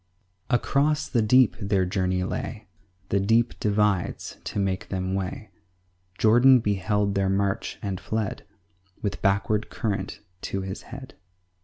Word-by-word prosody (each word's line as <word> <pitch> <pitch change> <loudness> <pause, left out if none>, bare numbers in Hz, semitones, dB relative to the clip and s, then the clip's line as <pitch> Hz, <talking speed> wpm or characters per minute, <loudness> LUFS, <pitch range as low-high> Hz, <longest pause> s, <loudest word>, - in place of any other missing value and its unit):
2 125 - +4
Across 150 +4 +1
the 120 - +2
deep 125 +3 +5
their 100 -2 +1
journey 90 -1 0
lay; 105 +3 -4 0.4
The 100 - +2
deep 115 +4 +2
divides 105 -3 0
to - - -4
make 95 -1 -1
them 95 -1 -2
way: 95 +3 -4 0.7
Jordan 120 +4 +6
beheld 105 -1 0
their 100 -1 +1
march, 100 0 -1
and 95 -3 -3
fled 110 -2 -3 0.6
With 100 -2 -2
backward 100 +2 +1
current 100 -2 -3 0.2
to 95 - -3
his 95 +1 -5
head. 130 +2 -9
100 Hz, 135 wpm, -25 LUFS, 95-115 Hz, 0.7 s, Jordan